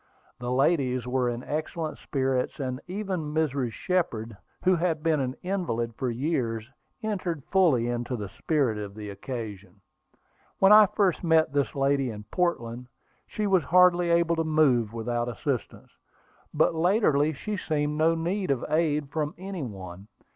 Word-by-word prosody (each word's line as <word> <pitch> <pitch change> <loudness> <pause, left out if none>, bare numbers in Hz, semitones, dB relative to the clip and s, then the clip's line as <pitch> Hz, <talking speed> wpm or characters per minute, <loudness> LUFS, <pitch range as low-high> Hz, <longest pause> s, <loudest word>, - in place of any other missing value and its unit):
The 125 0 -3
ladies 130 -2 +2
were 125 0 0
in 120 +1 -4
excellent 155 +1 -4
spirits, 130 -1 -1
and 130 -1 -3
even 185 -6 -3
Mrs. 140 -6 0
Shepard, 115 - -2 0.3
who 185 0 +4
had 165 -3 -1
been 160 -2 +2
an 130 -1 -2
invalid 170 -12 -2
for 130 +2 -2
years, 120 -4 -2 0.4
entered 185 -8 -2
fully 160 -12 +4
into 120 +1 -2
the 105 -4 -5
spirit 130 - 0
of 100 -1 -7
the 105 -1 -7
occasion. 105 -4 -7 0.8
When 195 +1 +5
I 210 0 +9
first 190 -3 +1
met 160 -3 +3
this 145 0 0
lady 135 -1 +1
in 105 -2 -7
Portland, 125 -9 -1 0.4
she 215 - -3
was 190 -4 +3
hardly 180 -1 +5
able 170 0 +3
to 165 - +1
move 140 -8 +3
without 120 +1 -2
assistance; 125 +1 -4 0.6
but 155 +2 +2
latterly 160 -4 +3
she 210 +8 -4
seemed 150 -4 -1
to 165 +1 +4
need 180 +4 -2
no 135 -3 0
aid 150 -3 +1
from 150 -1 -2
any 190 -1 -6
one. 95 -5 -8
145 Hz, 155 wpm, -27 LUFS, 120-170 Hz, 0.8 s, I